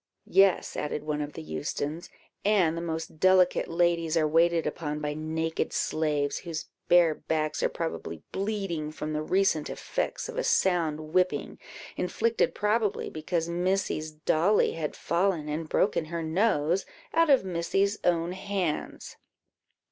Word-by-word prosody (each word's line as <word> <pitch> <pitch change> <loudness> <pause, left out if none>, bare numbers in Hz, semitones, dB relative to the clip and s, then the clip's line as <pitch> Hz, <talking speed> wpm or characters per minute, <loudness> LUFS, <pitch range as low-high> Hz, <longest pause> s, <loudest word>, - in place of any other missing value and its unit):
"Yes," 195 -2 +3
added 150 0 -3
one 150 -1 -2
of 145 0 -5
the - - -7
Eustons, 110 - -4 0.3
"and 190 -6 +3
the 170 - -3
most 160 -1 -5
delicate 185 0 +4
ladies 170 -1 +1
are 155 -1 +3
waited 165 +1 +3
upon 150 -2 -3
by 150 -1 -2
naked 160 +1 -2
slaves, 150 -2 0
whose 165 -3 -5 0.2
bare 175 -2 +5
backs 155 0 -2
are - - +2
probably 165 -1 -5
bleeding 195 -7 -2
from 155 0 -5
the 150 - -1
recent 185 -2 +1
effects - - -3
of 480 0 -4
a - - 0
sound 155 -4 +1
whipping, 185 0 +1 0.4
inflicted, 230 +5 0
probably, 210 0 0
because 165 +1 -2
Missy's 175 -2 -1
dolly 160 +6 +2
had 155 -2 -4
fallen, 170 -3 0
and 155 +1 -3
broken 190 -5 +1
her 165 +1 -4
nose, 175 0 +1 0.3
out 330 -1 +4
of 270 -8 +5
Missy's 195 +3 0
own 170 0 +1
hands." 185 -4 -3
170 Hz, 140 wpm, -28 LUFS, 155-190 Hz, 0.4 s, bare